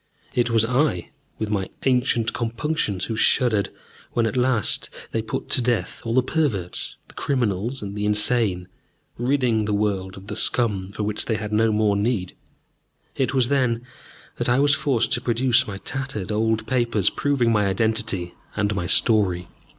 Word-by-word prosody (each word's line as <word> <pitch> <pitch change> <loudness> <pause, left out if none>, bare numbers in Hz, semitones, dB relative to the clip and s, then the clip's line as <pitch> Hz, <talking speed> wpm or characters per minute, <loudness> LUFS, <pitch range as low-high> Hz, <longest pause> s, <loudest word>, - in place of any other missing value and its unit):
It 120 -1 +1
was 115 -1 +3
I, 125 - 0 0.3
with 110 -1 -3
my 95 -3 -1 0.2
ancient 125 -3 +2
compunctions, 115 - -1
who 110 - -3
shuddered 110 -3 +3 0.4
when 120 -1 +2
at 115 - -1
last 125 -4 +2 0.2
they 115 - 0
put 110 0 -4
to - - +4
death 120 -1 -1
all 115 0 -2
the 130 - +4
perverts, 125 - -2
the - - -15
criminals, 120 -2 -1
and 100 0 -6
the 105 0 -1
insane, 105 -3 +2 0.5
ridding 120 -4 +1
the 105 0 0
world 100 -3 -1
of 95 - -11
the - - -5
scum 100 -6 0
for 105 - -4
which 105 0 -2
they 110 - 0
had 105 0 -4
no 110 +1 +3
more 105 -1 +2
need. 100 -3 -1 0.8
It 130 0 0
was 130 -2 +3
then 125 -4 +1 0.5
that - - 0
I 120 - +4
was 140 +1 +4
forced 135 -4 +1
to 125 -4 +2
produce 120 0 +2
my 100 -2 -5
tattered 125 -3 -4
old 110 +1 +1
papers, 115 -6 +1
proving 135 -5 +1
my 105 -2 +2
identity 100 -3 0 0.2
and 105 0 0
my 90 -4 -2
story. 90 -4 +3
110 Hz, 170 wpm, -23 LUFS, 105-125 Hz, 0.8 s, to